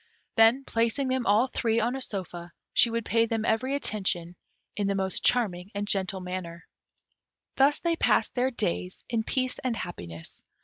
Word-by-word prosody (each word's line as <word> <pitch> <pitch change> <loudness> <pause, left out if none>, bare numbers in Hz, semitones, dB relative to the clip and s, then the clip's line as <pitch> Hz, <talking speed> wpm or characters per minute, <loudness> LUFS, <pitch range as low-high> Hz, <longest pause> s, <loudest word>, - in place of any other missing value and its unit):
Then, 225 +4 +5
placing 230 +4 0
them 260 -2 0
all 210 +5 +5
three 230 -3 0
on 240 +3 0
a 270 - -4
sofa, 175 -6 -4 0.2
she 235 - +5
would 230 -1 -2
pay 230 0 +2
them 225 -1 -1
every 255 +5 +1
attention 185 -9 0 0.4
in 205 -1 -1
the 200 - 0
most 190 -1 -2
charming 195 -7 +1
and 205 0 -2
gentle 190 -1 -1
manner. 180 -2 -6 0.9
Thus 280 +2 +4
they 335 -1 0
passed - - +2
their 255 +1 +1
days 90 - -3
in 230 -3 0
peace 255 +2 -1
and 250 -3 -1
happiness. 85 - -3
220 Hz, 170 wpm, -27 LUFS, 185-245 Hz, 0.9 s, Then